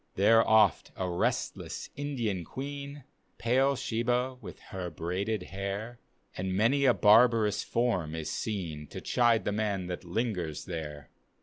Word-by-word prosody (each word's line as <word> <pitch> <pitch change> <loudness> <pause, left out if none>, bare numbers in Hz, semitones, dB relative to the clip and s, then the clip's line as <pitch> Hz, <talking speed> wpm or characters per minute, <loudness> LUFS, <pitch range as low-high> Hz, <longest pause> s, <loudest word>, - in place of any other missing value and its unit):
There 115 +4 +5
oft 110 -4 +4
a 95 - -2
restless 85 -1 -2
Indian 120 -10 -2
queen, 140 - -7 0.3
(Pale 135 +4 +2
Shebah 125 +2 -1
with - - -9 0.2
her 90 -2 -3
braided 90 +6 -2
hair,) 100 +5 -4 0.4
And 95 0 -2
many 135 +7 +3
a 125 - +6
barbarous 110 0 +5
form 90 -10 0
is 80 -1 -4
seen 85 -11 -4
To - - -7
chide 120 -2 +2
the - - 0
man 100 -3 -1
that 90 +1 -5
lingers 90 -5 -2
there. 75 -5 -6
105 Hz, 135 wpm, -30 LUFS, 90-120 Hz, 0.4 s, a